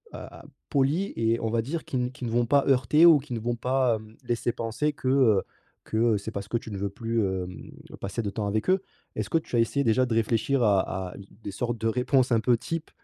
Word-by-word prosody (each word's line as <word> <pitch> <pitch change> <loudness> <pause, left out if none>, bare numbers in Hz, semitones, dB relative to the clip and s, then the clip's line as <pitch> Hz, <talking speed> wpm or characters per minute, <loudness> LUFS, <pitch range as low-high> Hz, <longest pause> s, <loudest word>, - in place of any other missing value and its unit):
heu, - - -6
a - - -11 0.2
polies 145 +8 +1
et 115 +1 +1
on 115 - -1
va 115 0 +1
dire 160 +6 -4
qui 130 - -3
n 125 0 -1
qui 130 -1 -7
ne 115 - -3
vont 120 +1 +2
pas 140 +2 +3
heurter 135 +4 +4
ou 165 -4 +8
qui 130 -2 -8
ne 115 - -2
vont 120 +1 -1
pas, 125 0 +1
hem, 110 0 -14
laisser 120 0 -1
penser 115 +7 -1
que, 135 - -6
heu, 125 -7 +4 0.4
que 110 0 +2
c'est 100 +2 -6
parce 100 -2 -5
que 120 - +1
tu 115 - -9
ne 100 - -4
veux 100 +1 -1
plus, 115 +2 -1
hem, 95 -1 -5 0.3
passer 100 +4 -3
de 100 - -2
temps 105 0 -3
avec 110 - -1
eux. 190 0 +2 0.3
Est-ce - - -3
que 165 - +4
tu 155 - -6
as - - +4
essayé 130 +5 +1
déjà 130 +1 +3
de 115 - -1
réfléchir 115 +3 +1
à 95 -3 +1
à - - -12
d 100 - -11 0.2
des - - -5
sortes 120 +4 -3
de 115 - 0
réponses 125 +3 +2
un 115 - +4
peu 120 0 +3
types 165 +6 -5
115 Hz, 260 wpm, -26 LUFS, 110-130 Hz, 0.4 s, ou